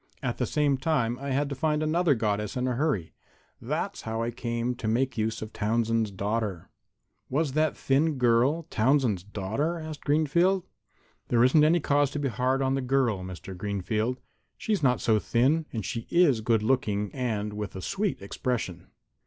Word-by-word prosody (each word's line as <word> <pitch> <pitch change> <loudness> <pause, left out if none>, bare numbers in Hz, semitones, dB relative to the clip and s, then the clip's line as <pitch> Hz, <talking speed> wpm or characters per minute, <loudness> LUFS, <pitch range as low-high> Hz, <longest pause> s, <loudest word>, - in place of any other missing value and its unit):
At - - -2
the - - 0
same 145 -2 +2
time 125 -5 0
I 140 +1 -5
had 140 +2 +1
to - - -3
find 150 +2 0
another 160 -1 +2
Goddess 105 0 -1
in 125 0 0
a 125 - 0
hurry. 120 - -1 0.5
That's - - -3
how 110 +1 -3
I 120 - -2
came 120 0 -2
to 120 - -4
make 125 +4 +1
use 110 0 -1
of 110 - -9
Townsend's 115 0 0
daughter." 100 -1 -3 0.6
"Was 145 +1 0
that 155 +2 +1
thin 145 +2 +1
girl 125 +6 +3
Townsend's 120 -4 +2
daughter?" 105 - -2
asked 155 -2 -7
Greenfield. 170 +6 +2 0.6
"There 120 -1 +3
isn't 140 +4 +5
any 165 +3 +4
cause 145 -1 +2
to 150 - -2
be 140 -2 0
hard 130 +3 0
on 130 0 +1
the 135 - 0
girl, 125 -5 +1
Mr. 95 +1 -8
Greenfield. 105 +5 -2 0.4
She's 210 -5 -1
not 125 -4 +2
so 110 -2 +3
thin, 140 +9 +1
and 110 -5 -4
she 115 +3 -4
is 160 -10 +4
good 110 -1 +2
looking 105 -5 0
and 110 -5 -2
with 105 -1 -5
a 95 - -5
sweet 195 - -2
expression. 100 -4 -3
125 Hz, 175 wpm, -27 LUFS, 110-145 Hz, 0.6 s, isn't